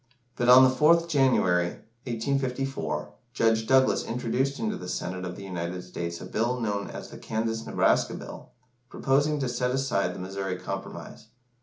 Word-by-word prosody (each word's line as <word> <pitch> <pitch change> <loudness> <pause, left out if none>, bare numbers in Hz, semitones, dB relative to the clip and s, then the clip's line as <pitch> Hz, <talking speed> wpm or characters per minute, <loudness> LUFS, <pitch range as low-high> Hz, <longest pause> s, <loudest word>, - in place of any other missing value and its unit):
But, 120 0 +1
on 130 +1 +10
the 130 - +6
4th 165 +5 +4
January, 130 - +3 0.4
1854, 135 +2 -2 0.2
Judge 110 -1 +2
Douglas 130 0 +4
introduced 125 +3 -1
into 215 -2 -2
the - - -7
Senate 95 0 -3
of 90 -1 -5
the 100 - -9
United 90 -1 -4
States 85 -1 -5
a - - -8
Bill 120 +3 -1
known 105 -3 -2
as - - -8
the - - -10
Kansas 115 0 -3
Nebraska - - +2
Bill, - - -9 0.4
proposing 145 +4 +1
to 135 - 0
set 125 +1 -1
aside 125 -9 0
the - - -7
Missouri 95 0 -4
Compromise. 110 - -7
120 Hz, 160 wpm, -27 LUFS, 95-135 Hz, 0.4 s, on